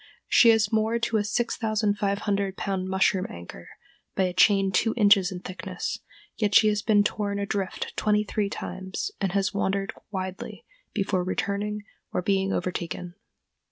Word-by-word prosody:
She 235 - +6
is 220 -2 +4
moored 220 +2 +1
to 230 -1 +1
a 210 - +1
6500 205 -3 0
pound 190 -1 -2
mushroom 190 0 +2
anchor 85 0 -10 0.5
by 190 - +2
a 180 -1 0
chain 195 +1 +4
two 220 +4 +1
inches 200 -3 +5
in 180 -1 -6
thickness, 185 - -5 0.4
yet 210 -2 +1
she 215 - +7
has 210 0 0
been 205 -1 +4
torn 205 -1 -1
adrift 200 -1 -3
twenty 210 0 +2
three 205 -1 -1
times, 190 - -5
and 195 -2 0
has 200 0 +1
wandered 195 0 -1 0.2
widely 190 -2 -6 0.3
before 195 -3 0
returning 205 +3 -2 0.3
or 180 - -1
being 195 0 +1
overtaken. 175 -1 -3
200 Hz, 150 wpm, -26 LUFS, 190-210 Hz, 0.5 s, she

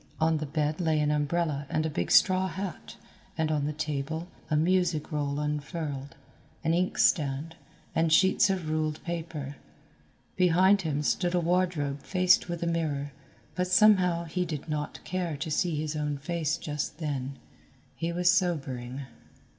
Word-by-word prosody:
On 160 0 +3
the 155 0 -4
bed 150 +2 -1
lay 160 -2 +2
an 150 0 +2
umbrella 150 -1 0
and 155 - 0
a - - 0
big 85 - -2
straw 185 -1 +5
hat, 190 -1 -6 0.4
and 160 -1 +1
on 150 -2 0
the 150 - -1
table, 155 +2 -3 0.2
a 155 - +1
music 170 -1 +1
roll 145 -1 -1
unfurled, 150 -1 -4 0.5
an 165 0 +2
ink 180 +2 0
stand, 150 0 +2 0.4
and 165 -1 +2
sheets 190 +4 +5
of 185 -4 -1
ruled 155 -1 -1
paper. 160 -5 -5 0.8
Behind 185 +2 +4
him 150 -4 -1
stood 175 +4 +1
a - - +3
wardrobe 170 -5 0
faced 185 -1 +3
with 170 0 -3
a - - 0
mirror, 155 -4 -1 0.4
but 180 +3 -1
somehow 180 -3 +5
he 175 +2 -2
did 155 -4 -5
not 150 -1 -4
care 175 -4 -2
to 155 +2 -4
see 165 +2 +1
his 155 +1 -2
own 150 -1 -1
face 155 +1 -1
just 150 0 -4
then. 140 -4 -3 0.6
He 165 +1 -2
was 175 +1 +3
sobering. 140 -9 -1
160 Hz, 160 wpm, -28 LUFS, 150-175 Hz, 0.8 s, straw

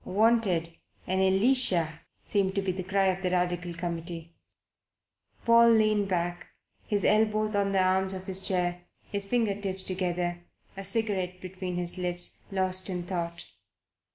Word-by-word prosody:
"Wanted: 195 -5 +2 0.3
an 185 +1 -1
Elisha," 190 - +3 0.3
seemed 195 -2 0
to 195 - +1
be 190 - 0
the 185 +1 -4
cry 195 +1 +1
of 185 0 -2
the 185 - 0
Radical 180 -1 -1
Committee. 170 -1 -5 1.1
Paul 235 0 +6
leaned 215 -2 +3
back, 175 -2 -2 0.4
his 205 -2 0
elbows 215 0 +2
on 200 -1 +1
the 190 -1 +3
arms 190 +1 +1
of 185 0 -8
his 190 0 +1
chair, 175 -2 0 0.2
his 200 -1 0
finger 230 -4 +1
tips 190 -1 -4
together, 175 -2 -2 0.3
a 195 - -6
cigarette 195 -3 0
between 185 0 -6
his 175 +1 0
lips, 175 -1 -2
lost 185 0 +1
in 180 -2 -3
thought. 170 -2 -4
185 Hz, 150 wpm, -28 LUFS, 175-200 Hz, 1.1 s, Paul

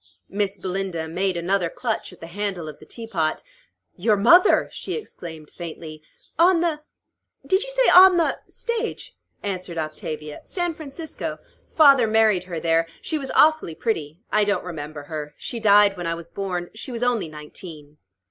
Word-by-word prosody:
Miss 200 0 -1
Belinda 185 -3 -3
made 185 +2 -1
another 175 0 0
clutch 225 +3 -3
at 180 - -16
the - - -6
handle 185 -1 -4
of 155 - -9
the - - -15
teapot. 190 -10 -2 0.5
"Your 210 +3 +2
mother!" 340 - +6
she - - -5
exclaimed 160 - -8
faintly. 160 -2 -8 0.4
"On 345 0 +5
the 325 -3 0 0.6
did 380 +1 +2
you - - -4
say, - - +2
on 370 0 +9
the" 335 - +1
"Stage," 470 -1 -4 0.3
answered 185 -3 -4
Octavia. 155 -1 -5
"San 350 -2 -2
Francisco. 310 +1 -6 0.3
Father 275 -7 +6
married 215 -4 +3
her 175 -3 -5
there. 165 0 +2 0.2
She 315 - 0
was 270 -2 -5
awfully 310 - +4
pretty. 160 -8 -2
I 215 - +4
don't 205 -2 0
remember 150 -3 -6
her. 150 -1 -6
She 235 - -4
died 205 -2 +5
when 175 -2 -4
I 165 - -1
was 170 0 -10
born. 180 -3 -4
She 230 +4 -7
was 240 0 -3
only 240 -7 +1
nineteen." 150 0 -11
195 Hz, 165 wpm, -23 LUFS, 165-245 Hz, 0.6 s, on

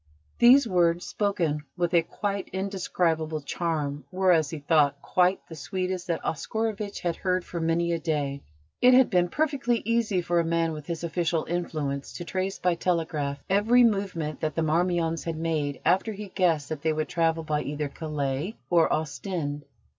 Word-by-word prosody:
These 250 +2 +7
words, 175 -3 +2
spoken 170 -8 -1
with 175 -1 0
a 170 - +6
quite 200 +3 -3
indescribable 175 -5 -1
charm, 150 -2 -2
were, 185 0 +3
as 160 -4 +3
he 160 - -5
thought, 145 -1 +2
quite 180 +5 +2
the - - -10
sweetest 185 +3 -3
that 170 -2 -2
Oscarovitch 210 +6 -3
had 170 -2 -1
heard 185 -1 0
for 170 - -5
many 165 +1 +1
a 170 - 0
day. 145 -4 -2 0.4
It 250 0 +7
had 260 -1 +5
been 175 -1 +3
perfectly 275 - 0
easy 230 -4 +1
for 175 0 +1
a - - +2
man 165 0 +1
with 150 -2 -7
his 170 -1 -4
official 170 -1 0
influence 150 -5 -3
to 175 - -6
trace 190 +2 -2
by 180 -1 +1
telegraph 155 -5 -1
every 220 +6 +4
movement 195 -9 0
that 155 - -2
the 165 - +1
Marmions 165 +1 +1
had 165 -2 -3
made 155 -4 -1
after 185 +6 +2
he 210 +1 -7
had 200 - -11
guessed 165 -6 +1
that 155 -2 -4
they 160 0 +1
would 155 -1 -2
travel 165 0 +1
by 150 -1 -1
either 150 +1 -3
Calais 150 - -3 0.2
or 170 -2 +4
Ostend. 150 -1 -3
170 Hz, 175 wpm, -27 LUFS, 155-185 Hz, 0.4 s, These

